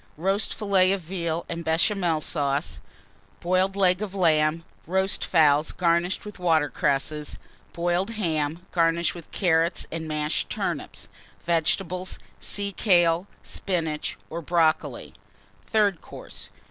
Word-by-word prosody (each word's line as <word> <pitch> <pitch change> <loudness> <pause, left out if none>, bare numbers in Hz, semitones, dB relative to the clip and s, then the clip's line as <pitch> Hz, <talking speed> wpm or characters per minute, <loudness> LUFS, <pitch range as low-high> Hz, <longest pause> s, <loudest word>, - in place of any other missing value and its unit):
Roast 195 +5 0
Fillet 195 -3 +3
of 195 - -2
Veal 170 -1 -3
and 170 0 -4
Béchamel 165 0 +1
Sauce. 145 -1 -1 0.6
Boiled 185 +2 +1
Leg 185 -1 +3
of 200 -2 -4
Lamb. 160 -2 +2 0.2
Roast 190 +2 +1
Fowls, 150 -3 +4
garnished 175 +2 +1
with 210 -2 -9
Water 160 -4 +2
cresses. 150 +2 -1 0.3
Boiled 175 +3 0
Ham, 165 -6 -2
garnished 170 0 +2
with 170 -2 -11
Carrots 170 -2 +1
and 160 -1 -4
mashed 150 0 -1
Turnips. - - -4 0.4
Vegetables 175 +2 0 0.2
Sea 200 -1 -2
kale, 175 -2 +3 0.2
Spinach, 160 -5 -2
or 170 +1 -5
Brocoli. 160 -1 0 0.5
THIRD 205 -5 +2
COURSE. - - -11
170 Hz, 120 wpm, -25 LUFS, 160-185 Hz, 0.6 s, Fowls